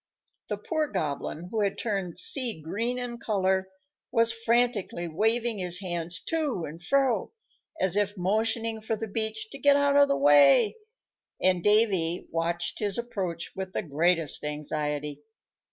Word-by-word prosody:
The - - -2
poor 315 -2 -1
Goblin, 165 - -4
who 220 - 0
had 200 -1 0
turned 195 -6 -3
sea 235 - +2
green 230 +10 -2
in 245 -1 -5
color, 190 -3 0 0.4
was 230 -1 +3
frantically 230 -6 0
waving 225 +6 0
his 180 -1 0
hands 175 -2 -3
to 290 - -2
and 160 +3 -10
fro, 260 0 +1 0.5
as 190 -1 +1
if 205 0 0
motioning 220 +4 0
for 220 +1 -2
the 225 +1 -5
beach 220 +1 -2
to 275 - -9
get 285 +1 +5
out 285 0 +3
of 285 0 +6
the 280 - +1
way; 145 - +5 0.6
and 185 -1 +2
Davy 195 -6 +2
watched 170 +1 -2
his 205 -1 -1
approach 190 -8 -4
with 190 -1 -5
the - - -2
greatest 165 +1 +2
anxiety. 150 -1 -3
200 Hz, 150 wpm, -27 LUFS, 170-230 Hz, 0.6 s, of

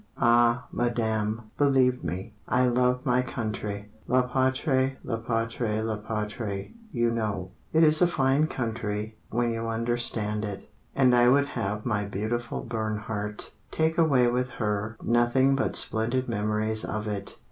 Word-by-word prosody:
_" - - -27
Ah, 120 +1 +4
Madame, 110 -2 -1
believe 130 -3 +3
me, 95 +5 -4
I 125 +1 +3
love 125 +1 +2
my 125 -1 +3
country 105 -4 -4 0.2
La 125 +1 +3
patrie, 130 +1 +1
la 115 - -2
patrie, 115 -1 -1
la 110 -1 -2
patrie, 105 - -4 0.2
you 120 -5 +1
know: 105 -5 -2 0.2
It 160 +1 +4
is 155 +1 +6
a 180 - +6
fine 135 -1 +2
country 110 -4 -4
when 120 +1 0
you 115 0 -3
understand 115 -2 0
it, 100 -2 -6 0.3
And 130 -2 +4
I 120 0 +6
would 140 +2 +4
have 105 -4 -3
my 105 -4 0
beautiful 110 +4 -3
Bernhardt 110 -2 -3 0.2
Take 160 +2 0
away 140 -7 +4
with 125 +1 +1
her 105 0 -2
Nothing 120 +3 +3
but 135 - -1
splendid 120 +4 +1
memories 110 0 0
of 110 0 -3
it. 100 -2 -3
115 Hz, 145 wpm, -27 LUFS, 105-125 Hz, 0.3 s, is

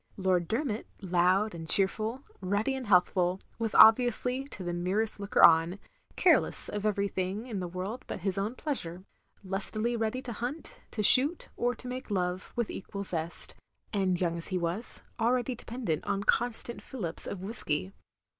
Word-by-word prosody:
Lord 185 -3 +1
Dermot, 225 -2 -2
— - - -31
loud 185 +4 +2
and 165 -1 -8
cheerful, 215 - +2 0.2
ruddy 205 +7 0
and 260 -3 -5
healthful, 180 -1 +3 0.2
was 225 -2 -2
obviously, 250 +3 +5
to 205 - -8
the 175 -1 -3
merest 195 +6 -1
looker 200 0 +5
on, 165 +3 +4 0.4
careless - - +3
of 210 0 -2
everything 200 0 -2
in 225 -6 -4
the 180 - -3
world 185 +7 -5
but - - -5
his 190 0 -1
own 205 +5 -2
pleasure; 185 - -4 0.4
lustily 215 +5 0
ready 225 +2 -1
to 240 - -5
hunt, 250 +8 -5
to 215 - -3
shoot, 280 - +6
or 245 0 0
to 250 - -9
make 255 0 -6
love, 180 -2 -2
with 235 -2 -1
equal 200 +1 -6
zest; 170 -3 -4 0.4
and 190 -3 +1
young 170 -2 -1
as 165 - 0
he 185 - -1
was, 175 +6 -1 0.2
already 245 +2 +1
dependent 230 -8 -4
on 200 - -1
constant 235 +1 0
fillips 190 -11 -2
of 190 - -5
whiskey. 190 -3 -2
200 Hz, 165 wpm, -29 LUFS, 180-235 Hz, 0.4 s, shoot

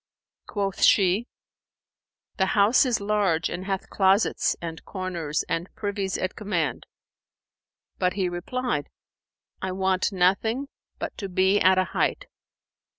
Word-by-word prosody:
Quoth 195 -2 -3
she, 200 +4 +4 1.1
"The 190 - +2
house 215 +6 +5
is 240 -3 +1
large 200 -6 +1
and 185 +2 -5
hath 195 -1 -3
closets 195 +2 +2
and 165 -1 -7
corners 175 -6 -3
and 165 +2 -2
privies 200 -2 -2
at 185 - -3
command." 180 - -2 1.1
But 180 0 +1
he 195 -2 0
replied, 175 - -3 0.7
"I 190 - -2
want 190 +1 +1
nothing 205 +9 +1 0.3
but - - -5
to 195 - -4
be 190 +2 +3
at 185 0 +5
a 185 - +4
height." - - 0
190 Hz, 125 wpm, -25 LUFS, 180-205 Hz, 1.1 s, house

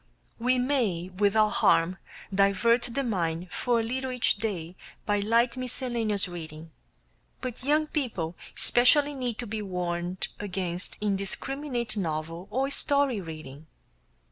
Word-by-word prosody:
We 250 +2 +2
may 235 -10 0
without 210 +1 +4
harm 170 +3 +4 0.4
divert 200 +5 +4
the 275 +4 -1
mind 180 -5 -1
for 240 -2 +1
a - - 0
little 260 +3 -2
each 250 -4 +2
day 185 -5 -3 0.3
by 205 -1 +2
light 230 +5 +2
miscellaneous 240 -5 -1
reading, 160 -2 -8 0.7
but 250 -1 -6
young 300 +3 +3
people 225 - -2 0.2
especially 285 +4 +5
need 250 -5 -3
to 245 - -4
be 215 0 -4
warned 180 -2 -3
against 185 -3 -3
indiscriminate 235 +5 -1
novel 165 0 -3
or 270 +3 0
story 280 -7 +3
reading. 155 -3 -9
210 Hz, 125 wpm, -28 LUFS, 180-250 Hz, 0.7 s, especially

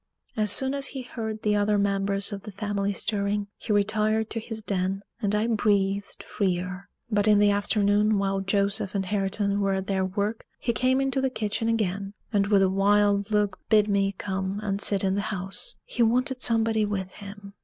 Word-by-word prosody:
As 215 -2 +1
soon 265 0 +3
as 275 -1 +1
he 265 -1 -6
heard 220 -3 -5
the 210 -1 +2
other 205 0 +2
members 200 0 0
of 200 - -5
the 210 - -9
family 200 0 -2
stirring, 200 0 -1
he - - -6
retired 215 +1 +1
to 225 - -2
his 220 -1 -7
den, 195 0 -2 0.2
and 205 -1 0
I 210 +1 +1
breathed 200 -3 0
freer. 185 -1 -2 0.2
But 205 0 +2
in 210 -1 +6
the 205 0 +5
afternoon, 205 +1 +2
while 195 0 0
Joseph 200 +1 0
and 195 -1 0
Hareton 200 +1 0
were 195 -1 +1
at 190 0 -2
their 190 -1 0
work, 200 +4 -2
he 235 - -1
came 255 +3 +2
into 270 0 0
the 265 - +1
kitchen 225 -1 -2
again, 200 -2 -1 0.2
and 200 -1 +2
with 200 -2 +4
a - - +4
wild 200 +1 +3
look 210 -3 0
bid 210 -1 +5
me 200 -1 +1
come 190 0 -3
and 200 -1 -2
sit 200 -1 +1
in 190 -1 +1
the 200 - 0
house 195 - -4
he - - -3
wanted 250 +3 +2
somebody 225 -2 +3
with 195 -3 -3
him. 200 0 -10
205 Hz, 195 wpm, -26 LUFS, 195-215 Hz, 0.2 s, in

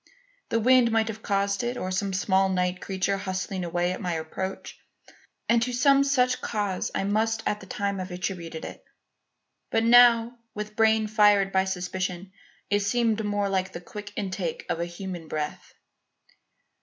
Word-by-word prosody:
The 230 - +1
wind 250 0 +5
might 225 0 +2
have 220 0 -6
caused 200 -1 0
it 240 +1 -2
or 185 - -3
some 195 +1 -1
small 190 0 +2
night 180 -1 -1
creature 195 +1 -1
hustling 190 -1 -3
away 175 +1 0
at 185 - -5
my 180 -3 -2
approach; 165 +4 -5 0.7
and 235 0 +3
to 250 +2 0
some 275 +3 +4
such 255 -2 +2
cause 205 -4 -2
I - - 0
must 220 +2 0
at 210 - 0
the 190 - -12
time 200 0 -2
have 185 0 -5
attributed 180 -3 -5
it. - - -9 0.9
But 225 - +1
now, 235 0 +6 0.2
with 210 0 -6
brain 220 0 +3
fired 205 -2 +4
by 190 0 +2
suspicion, 185 0 -3 0.4
it 205 - +3
seemed 220 +1 +1
more 205 -1 0
like 190 -1 -1
the - - -5
quick 205 +3 -9
intake 185 -4 -3
of 165 - -1
a 170 - -1
human 175 -1 -7
breath. 150 -1 -5
200 Hz, 170 wpm, -26 LUFS, 185-220 Hz, 0.9 s, now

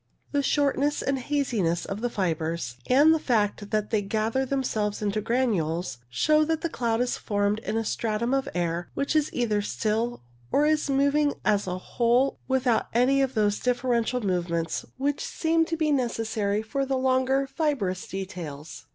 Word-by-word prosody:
The 285 - +1
shortness 285 +1 +1
and 270 -1 0
haziness 240 - 0
of 195 +2 -5
the 245 - 0
fibres, 165 - -2
and 290 +5 +6
the 320 - +1
fact 210 -5 0
that 215 -1 -1
they 215 -2 +2
gather 220 +6 -1
themselves 220 -6 -1
into 210 0 -1
granules, 180 - 0
shows 305 - +3
that 320 -1 0
the 335 - -1
cloud 235 -4 0
is 245 - -1
formed 205 0 0
in 225 - -3
a 225 - -1
stratum 230 +3 -1
of 270 -1 0
air 170 0 -1
which 280 +3 -1
is 305 -1 +2
either 215 -4 0
still, 220 - -2 0.3
or 290 - +3
is 305 -1 +1
moving 280 +2 +2
as 205 -2 +2
a 180 0 -2
whole, 240 +7 +1
without 255 -3 +1
any 265 +3 +4
of 265 -1 0
those 205 -1 +2
differential 245 -1 0
movements 170 -3 -1
which 280 +2 -1
seem 325 0 +1
to 330 0 -3
be 310 -1 +1
necessary 220 -5 0
for 275 +5 -2
the 270 0 0
longer 260 +1 +2
fibrous 265 - -1
details. 170 -6 -7
235 Hz, 170 wpm, -26 LUFS, 205-275 Hz, 0.3 s, and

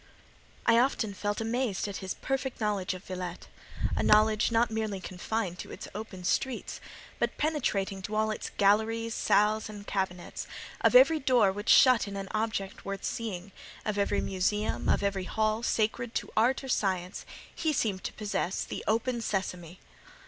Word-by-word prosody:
I 230 0 +6
often 240 -5 +1
felt 205 +2 -2
amazed 225 -3 -1
at 200 - -4
his 190 -1 -4
perfect 270 -1 -3
knowledge 205 -4 0
of 185 - -10
Villette; 180 -2 -6 0.5
a - - 0
knowledge 215 +1 +4
not 230 0 +3
merely 220 -3 -2
confined 185 +1 -3
to - - -7
its - - -8
open 205 -3 -7
streets, 260 +8 -1 0.4
but - - 0
penetrating 205 -11 0
to 210 +3 -4
all 215 0 +2
its 215 - -4
galleries, 220 +3 +2
salles, 215 +1 +2
and 205 -1 -9
cabinets: 190 -3 -3 0.4
of - - +4
every 415 -11 +7
door 250 -8 +4
which 205 +3 -5
shut 255 -5 +7
in 200 0 -5
an 195 -1 -5
object 215 -3 -2
worth 195 0 -5
seeing, 200 -4 -4 0.3
of 210 -1 -1
every 200 - +1
museum, 200 +3 0
of - - +2
every 195 -2 0
hall, 215 +2 0
sacred 225 +1 0
to - - -2
art 245 +5 +3
or - - -6
science, 185 -6 -1 0.3
he 320 - 0
seemed 210 -9 0
to - - -3
possess 200 -3 -2
the - - -6
"Open! 235 +2 +1
Sesame." 180 -4 -3
210 Hz, 165 wpm, -29 LUFS, 195-230 Hz, 0.5 s, every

